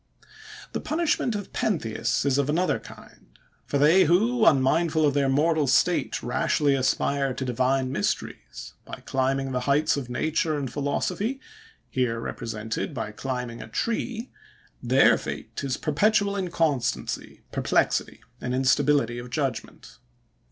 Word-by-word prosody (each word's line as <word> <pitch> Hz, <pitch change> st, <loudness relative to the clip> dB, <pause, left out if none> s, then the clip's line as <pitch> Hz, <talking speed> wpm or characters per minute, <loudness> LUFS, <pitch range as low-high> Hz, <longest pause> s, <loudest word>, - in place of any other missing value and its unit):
The -, -, -3 dB
punishment 310 Hz, -8 st, 0 dB
of 205 Hz, -2 st, -6 dB
Pentheus 120 Hz, -, -1 dB
is 140 Hz, 0 st, +2 dB
of 140 Hz, 0 st, 0 dB
another 175 Hz, +5 st, +1 dB
kind; -, -, -15 dB, 0.4 s
for 140 Hz, -, 0 dB
they 160 Hz, +7 st, +5 dB
who, 220 Hz, +8 st, +3 dB
unmindful 155 Hz, +3 st, +3 dB
of 145 Hz, -, +2 dB
their 140 Hz, -1 st, +2 dB
mortal 150 Hz, +2 st, +2 dB
state, -, -, +2 dB
rashly 145 Hz, -2 st, +1 dB
aspire 135 Hz, 0 st, 0 dB
to 130 Hz, -, -3 dB
divine 130 Hz, +1 st, 0 dB
mysteries, 80 Hz, -, -4 dB
by -, -, -10 dB
climbing 135 Hz, 0 st, 0 dB
the 125 Hz, -, 0 dB
heights 150 Hz, +2 st, +3 dB
of 130 Hz, -3 st, -5 dB
nature 155 Hz, +4 st, 0 dB
and 135 Hz, -3 st, -4 dB
philosophy, 180 Hz, -, -1 dB, 0.5 s
here 120 Hz, -3 st, -1 dB
represented 115 Hz, +4 st, -4 dB
by 110 Hz, -3 st, -4 dB
climbing 125 Hz, 0 st, -5 dB
a -, -, -8 dB
tree,—their 240 Hz, -, 0 dB
fate -, -, -6 dB
is 135 Hz, -2 st, -1 dB
perpetual 200 Hz, +6 st, +2 dB
inconstancy, 165 Hz, -, -2 dB
perplexity, -, -, 0 dB, 0.2 s
and 125 Hz, 0 st, -2 dB
instability 130 Hz, -2 st, +2 dB
of 120 Hz, +1 st, -8 dB
judgment. 135 Hz, -2 st, -4 dB
140 Hz, 130 wpm, -25 LUFS, 130-165 Hz, 0.5 s, they